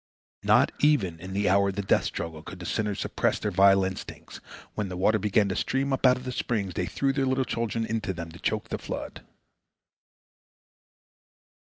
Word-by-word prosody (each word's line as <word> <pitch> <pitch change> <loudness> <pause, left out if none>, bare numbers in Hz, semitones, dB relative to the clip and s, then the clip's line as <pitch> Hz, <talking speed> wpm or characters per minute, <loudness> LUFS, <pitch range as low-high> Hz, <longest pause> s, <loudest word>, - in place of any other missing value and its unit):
Not - - +4
even 105 - +2
in 95 +2 -8
the 100 +1 0
hour 100 +1 +4
of 95 - -5
the 100 - -2
death - - +2
struggle 80 -2 -4
could 90 - -9
the 90 - -7
sinners 105 0 -1
suppress - - 0
their 105 - -2
vile 95 +1 +5
instincts. 95 0 -6 0.4
When 105 -3 -3
the 90 - -5
water 110 +4 +3
began 105 0 +2
to 95 - -2
stream 135 +1 0
up 135 - +3
out 125 - +4
of 125 - -9
the 130 - -4
springs, 105 -7 -2
they 90 - -2
threw 135 -1 0
their 135 -1 0
little 130 0 +1
children 115 -1 -2
into 110 -3 -2
them, 85 -2 -6
to 85 - -12
choke - - -2
the - - -3
flood. - - -6
100 Hz, 195 wpm, -27 LUFS, 95-120 Hz, 0.4 s, vile